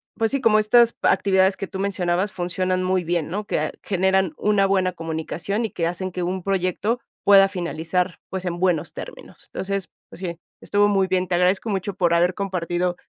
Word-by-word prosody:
pues 225 0 +1
sí, 275 - 0
como 215 -3 +4
estas 235 +2 +4
actividades 190 -1 +3
que 195 - -4
tú 190 - -7
mencionabas 190 0 0
funcionan 185 +1 -1
muy 185 0 +1
bien, 170 -2 -1
¿no? 205 +4 -3
Que - - 0
a - - -1
generan 190 -2 +1
una 205 -2 +2
buena 190 -1 +2
comunicación 165 +6 -3
y 220 - -5
que 165 -1 -1
hacen 185 +2 -4
que 180 - -4
un 185 +1 -3
proyecto 195 +5 0 0.2
pueda 195 -1 +7
finalizar, 175 0 -2
pues, 190 -1 -5
en 175 -1 -3
buenos 180 -5 0
términos. - - -10
Entonces, 195 0 -3 0.2
pues - - -12
sí, 170 -2 -5 0.2
estuvo 205 0 +2
muy 195 -2 +2
bien. 185 0 0
Te 175 - -3
agradezco 180 +5 +2
mucho 195 -1 -2
por 175 -3 +2
haber 175 +2 +2
compartido, 180 -2 -2
185 Hz, 195 wpm, -23 LUFS, 175-195 Hz, 0.2 s, pueda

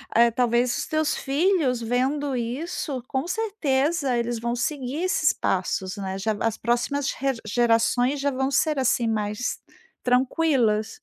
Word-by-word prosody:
eh, 235 0 +6
talvez 240 +1 +1
os - - -2
teus 310 -1 +1
filhos 280 -4 +1
vendo 260 +4 0
isso, 255 +2 -3
com 265 +5 -2
certeza 310 - 0
eles 235 -1 -1
vão 235 +1 -2
seguir 275 +5 -2
esses 345 -4 +2
passos, 185 +1 -2
né 190 -1 -4
já, 215 +2 -1
as 225 -1 0
próximas 245 +4 0
re 270 0 -1
gerações 240 +4 +2
já 285 0 +1
vão 265 +1 -1
ser, 310 -4 +2
assim, 240 -2 +2
mais 210 +2 -2 0.5
tranquilas. 250 -4 +1
250 Hz, 140 wpm, -24 LUFS, 235-285 Hz, 0.5 s, eh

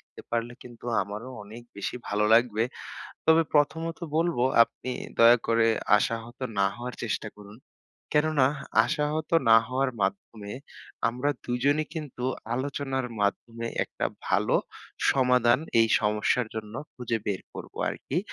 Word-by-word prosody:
দিতে - - -15
পারলে 120 0 -1
কিন্তু 120 -1 -13 0.2
আমারও 105 +6 -7
অনেক 110 +4 -11
বেশি 100 - -3
ভালো 105 +1 +1
লাগবে। 115 -2 +3 0.6
তবে 160 0 +6
প্রথমত 160 +3 +1 0.2
বলবো, 165 -7 +1 0.2
আপনি 115 +2 -7 0.3
দয়া 115 +1 +8
করে 115 0 +3 0.3
আশাহত 115 +3 -3 0.2
না 100 - +5
হওয়ার 125 +1 -6
চেষ্টা 110 -1 -2
করুন। 105 +1 -13 0.6
কেননা, 150 -3 +3 0.4
আশাহত 150 +1 -1 0.2
না 115 - +9
হওয়ার 130 +1 0
মাধ্যমে 100 +2 -3 0.6
আমরা 125 +5 -1
দুইজনেই 140 +5 +1
কিন্তু 150 -6 -6 0.3
আলোচনার 135 0 -2
মাধ্যমে 115 +3 -1 0.2
একটা - - -5 0.2
ভালো - - +2 0.6
সমাধান 125 -2 +4 0.2
এই 115 - +5
সমস্যার 105 +3 +1
জন্য 110 -1 -6 0.2
খুঁজে 120 -2 -2
বের 100 -3 -1
করবো - - -9
আরকি। - - -3
120 Hz, 130 wpm, -27 LUFS, 110-135 Hz, 0.6 s, না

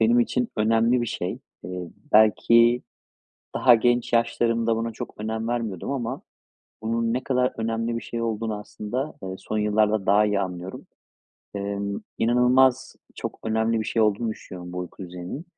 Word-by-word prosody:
benim 115 +2 +5
için 125 0 0
önemli 115 +3 +3
bir 120 - -1
şey. 90 -3 -3 0.2
Eee, 90 -1 -6 0.2
belki 115 +3 +5 0.7
daha 125 -2 +6
genç 120 +1 +1
yaşlarımda 115 -1 +2
buna 115 +1 -2
çok - - -7
önem 110 +1 -3
vermiyordum 115 -4 -2
ama 130 -1 -3 0.6
bunun 115 +1 0
ne 125 +1 -2
kadar 125 -1 +1
önemli 115 +1 -1
bir - - -4
şey 115 -1 -4
olduğunu 110 -1 -2
aslında, 120 +7 -5
eee, 95 0 -4
son 110 - -3
yıllarda 105 -1 +2
daha 105 +2 +5
iyi 105 -1 +1
anlıyorum. 90 -1 -5 0.7
Emm, 100 0 -3 0.2
inanılmaz 125 +2 +3 0.2
çok - - -6
önemli 110 +1 +1
bir - - -2
şey 115 - +1
olduğunu 110 +2 +1
düşünüyorum 90 -4 -9
bu 90 - -5
uyku 90 +2 -7
düzeninin. 90 - -7
115 Hz, 155 wpm, -25 LUFS, 105-120 Hz, 0.7 s, daha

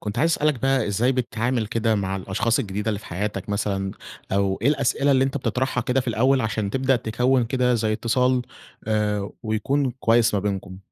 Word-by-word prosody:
كنت 105 +2 -4
عايز 165 +5 +3
أسألك 150 -6 0
بقى 135 0 +2
إزاي 120 +6 +2
بتتعامل 120 -1 -1
كده 115 0 0
مع 95 -1 -1
الأشخاص 105 +5 0
الجديدة 105 +1 -3
اللي 105 -2 -1
في - - -13
حياتك 100 +2 -4
مثلًا، 100 -1 -1 0.4
أو 100 0 +1
إيه 125 - +3
الأسئلة 140 0 +2
اللي 135 -1 +4
أنتَ 135 +1 -2
بتطرحها 130 0 -1
كده 125 +2 +1
في 125 - -4
الأول 130 +4 +2
عشان 110 -3 -1
تبدأ 130 +2 +2
تكوِّن 125 +2 +1
كده 125 +1 +1
زي 110 -2 0
اتصال 125 +3 +1 0.4
آآ 105 -2 0
ويكون 130 +5 0
كويس 115 -1 +3
ما 100 - +1
بينكم؟ 95 -2 -4
115 Hz, 185 wpm, -23 LUFS, 105-130 Hz, 0.4 s, اللي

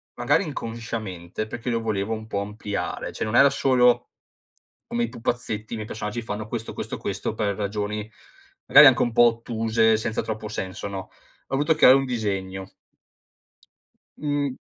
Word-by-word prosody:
magari - - +2
inconsciamente 115 - -5
perché 120 +3 -5
lo 115 -1 +1
volevo 110 -2 -2
un 110 0 -6
po' 100 -2 -2
ampliare, 105 0 -4
cioè, - - -3
non 110 +3 0
era 140 - +8
solo 125 -3 +3 0.8
come 120 - -1
i - - -2
pupazzetti, 115 -2 -3
i - - -3
miei 110 -1 -5
personaggi 110 +1 -4
fanno 110 -1 -5
questo, 115 0 -4
questo, - - -4
questo - - -3
per 105 -3 -1
ragioni 105 +1 -3 0.6
magari 150 - +10
anche 130 -3 +6
un 120 - 0
po' 120 +1 +6
ottuse, 115 -1 +2
senza 110 0 -2
troppo 110 -1 -5
senso, 95 -2 -5
no, 100 -1 -5
ho - - -13 0.4
voluto 145 +4 +2
creare 135 -4 +7
un 135 0 0
disegno. 95 -5 -3 1.5
Mhmm 145 -3 -1
110 Hz, 160 wpm, -24 LUFS, 105-120 Hz, 1.5 s, magari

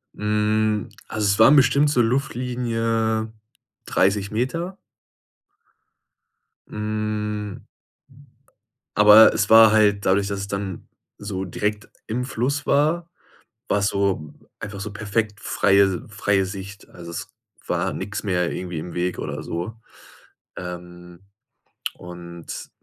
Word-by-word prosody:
Hm, 105 0 0 0.2
also, 110 -1 -2
es 100 0 +2
waren 150 - +8
bestimmt 140 +2 +4
so 125 -4 +3
Luftlinie 115 -3 -1 0.5
30 100 +1 +1
Meter. 165 - -2 1.9
Hm. 105 -1 -3 1.3
Aber 105 +1 +8
es 105 -2 0
war 110 -1 +8
halt 105 -2 +3
dadurch, 100 +1 +2
dass 100 -1 -3
es 100 - -5
dann 100 -2 -5 0.3
so 95 -2 -4
direkt 105 +4 -3 0.2
im 125 +3 -2
Fluss 130 +4 -2
war, 160 +4 +2 0.6
war 105 - +1
es 100 - +1
so 100 -7 -1 0.3
einfach 100 -2 -7
so 105 +1 -5
perfekt 105 0 -2
freie 95 -2 +2
freie 100 -2 +1
Sicht. 100 +1 -8
Also, 85 -1 -10
es - - -6 0.4
war - - -1
nix 105 +2 -5
mehr 90 -4 0
irgendwie 90 -3 -4
im 85 +2 -7
Weg 90 +1 -2
oder - - -4
so. 85 +6 -4 0.8
Ähm, 90 0 -9 0.8
und, 85 -1 -9
105 Hz, 115 wpm, -23 LUFS, 95-110 Hz, 1.9 s, waren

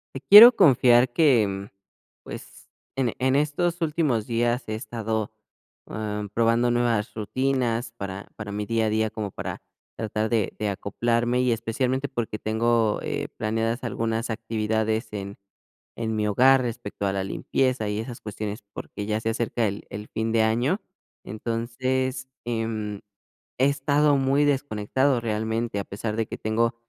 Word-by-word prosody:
Te - - -3
quiero 210 - +11
confiar 125 - +5
que, 130 -8 +4
mm, 100 0 -5 0.6
pues, - - -10 0.3
en 125 -4 +1
en 130 +1 +2
estos 165 +4 0
últimos 150 -9 0
días 120 +1 0
he 110 - -3
estado, 110 -2 -3 0.6
am, 105 -1 -4
probando 115 +3 +2
nuevas 120 -3 0
rutinas 120 +1 -1
para 100 -2 -6
para 105 -1 -7
mi 105 +1 -3
día 115 0 0
a - - +1
día, 110 0 +1
como 105 -2 -5
para - - -6 0.3
tratar 110 0 -2
de 110 -5 0
de 105 - -1
acoplarme, 120 +5 0
y 125 -2 +2
especialmente 130 +4 -1
porque 115 -4 -3
tengo, 110 0 +1
eh, - - -3
planeadas 115 +3 -1
algunas 115 0 -2
actividades 110 0 -1
en 100 -1 -6 0.6
en 110 -1 -3
mi 105 0 0
hogar 130 +6 +5
respecto 110 -4 -4
a 95 - 0
la 95 -1 -1
limpieza 125 +3 -1
y 105 +1 -2
esas 115 +1 -6
cuestiones, 105 0 -5
porque 105 - -6
ya 110 +1 -1
se 115 - -1
acerca 115 0 -1
el 100 +1 -5
el 105 +1 -7
fin 110 0 -2
de 115 - +4
año. 120 - +1 0.4
Entonces, 130 +4 -2 0.2
em, 115 -3 -2 0.6
he 135 - +5
estado 145 +1 +2
muy 135 +2 +2
desconectado 130 -1 +1
realmente. 110 0 -2
A 100 - -4
pesar 105 +2 -4
de 115 - 0
que - - -6
tengo, 115 +2 0
115 Hz, 155 wpm, -25 LUFS, 110-130 Hz, 0.6 s, quiero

